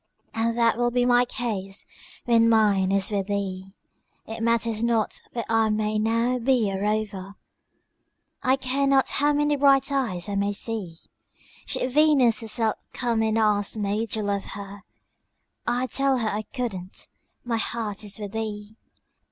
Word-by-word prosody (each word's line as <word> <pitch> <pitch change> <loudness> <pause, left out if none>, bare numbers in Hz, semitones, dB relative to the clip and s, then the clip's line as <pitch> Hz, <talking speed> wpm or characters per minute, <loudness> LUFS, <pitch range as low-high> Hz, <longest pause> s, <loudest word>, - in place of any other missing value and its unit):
And 230 +1 -1
that 230 -1 +3
will 240 0 +2
be 245 0 +1
my 245 0 +4
case 205 -6 -4 0.4
when 230 -1 +4
mine 205 -4 +3
is 195 +1 +1
with 200 -2 -1
thee. 195 -2 -3 0.5
It 225 0 -7
matters 230 -1 +1
not 230 -2 0
where 235 -2 -3
I 225 -1 +2
may 215 0 0
now 230 +3 +1
be 235 -4 +2
a 195 0 -3
rover, 205 -2 -2 1.1
I 260 0 +3
care 270 +1 0
not 270 -1 +3
how 290 +1 +2
many 295 0 +2
bright 275 -1 +4
eyes 225 -10 -1
I 205 - -4
may 200 +1 0
see; 205 -5 -3 0.7
Should 255 - -1
Venus 275 -6 +4
herself 225 -1 0 0.2
come 235 -3 0
and 220 0 +1
ask 210 -1 +2
me 210 +2 -1
to 215 0 -2
love 200 -1 -1
her, 200 0 -8 0.9
I'd 245 +1 0
tell 275 -1 +2
her 225 -3 0
I 210 +1 -2
couldn't 200 -8 -5 0.3
my 235 -2 -1
heart 220 -3 -2
is 205 0 -5
with 205 -2 -6
thee. 215 -1 -5
225 Hz, 160 wpm, -25 LUFS, 205-245 Hz, 1.1 s, my